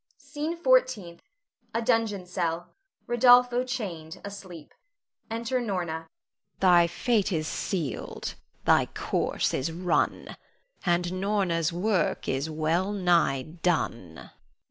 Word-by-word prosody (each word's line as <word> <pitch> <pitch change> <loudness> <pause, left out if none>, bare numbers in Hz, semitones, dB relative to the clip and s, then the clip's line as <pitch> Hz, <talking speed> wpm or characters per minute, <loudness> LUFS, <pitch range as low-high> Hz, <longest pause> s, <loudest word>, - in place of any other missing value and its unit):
SCENE 295 +4 -4
FOURTEENTH. 255 - +2 0.5
[A 230 - +1
dungeon 225 -5 +1
cell. 175 -1 -3 0.3
Rodolpho 245 +1 +5
chained, 190 -11 -5
asleep. 185 -6 -9 0.6
Enter 235 +3 -1
Norna.] 240 - -4 0.2
Norna. 160 0 -6 0.5
Thy 175 -2 +6
fate 210 +3 0
is 155 -3 -1
sealed, 165 -7 -3 0.3
thy - - +4
course - - -1
is 135 +5 -1
run, 175 +2 -1 0.5
And 175 +1 +1
Norna's 190 -5 +1
work 180 0 0
is 135 +4 -1
well 160 +5 0
nigh 175 -9 +2
done. 155 - -2
180 Hz, 105 wpm, -27 LUFS, 165-230 Hz, 0.6 s, Thy